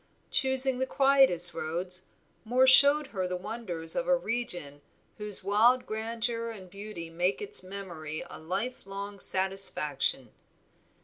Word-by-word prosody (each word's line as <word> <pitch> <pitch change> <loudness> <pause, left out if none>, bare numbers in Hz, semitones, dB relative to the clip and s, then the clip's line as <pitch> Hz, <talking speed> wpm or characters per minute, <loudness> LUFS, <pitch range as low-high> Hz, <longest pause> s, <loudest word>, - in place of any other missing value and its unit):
Choosing 265 -1 +1
the 260 - -1
quietest 270 -12 +6
roads, 180 +4 -3 0.4
Moor 250 +3 +3
showed 285 +3 +6
her 185 -2 -2
the 180 - -3
wonders 180 -5 -4
of 260 0 -2
a 270 0 +3
region 195 - -5 0.4
whose 210 -2 -4
wild 230 +6 +3
grandeur 230 +1 -3
and 190 -5 -11
beauty 200 -4 -9
make 175 +3 -1
its 425 0 -1
memory 175 -5 -7
a - - -10
life 195 +8 -5
long 200 +1 -7
satisfaction. 185 -10 -1
200 Hz, 130 wpm, -28 LUFS, 180-245 Hz, 0.4 s, quietest